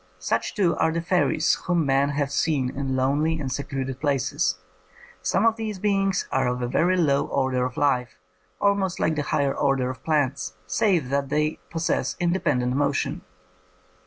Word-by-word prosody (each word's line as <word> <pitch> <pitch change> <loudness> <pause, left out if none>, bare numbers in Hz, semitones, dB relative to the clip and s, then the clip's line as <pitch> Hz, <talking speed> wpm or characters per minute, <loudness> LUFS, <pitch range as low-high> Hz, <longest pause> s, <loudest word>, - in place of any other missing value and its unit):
Such, 90 +5 -2
too, 175 -5 +2
are 160 - +2
the 165 - -1
fairies 170 -2 +2
whom 175 -3 +2
men 135 +1 +2
have 140 -1 -1
seen 140 -5 0
in 135 -1 -2
lonely 145 +5 +1
and 135 -3 -3
secluded 135 -2 -4
places. 135 -10 0 0.6
Some 140 - +1
of 225 0 +3
these 215 -3 -4
beings 195 -1 0
are 130 -1 +1
of 125 0 -2
a - - 0
very 180 +8 +2
low 140 -5 +2
order 130 -2 0
of 125 0 -5
life, 125 -6 +1 0.4
almost 200 -2 +1
like 160 - +2
the 150 - 0
higher 140 -1 +1
order 135 -3 +1
of 130 - -12
plants, 140 - 0
save 130 - +1
that 140 0 -1
they 150 +1 0
possess 165 0 -1
independent 130 -8 +1
motion. 140 0 0
140 Hz, 165 wpm, -24 LUFS, 130-165 Hz, 0.6 s, of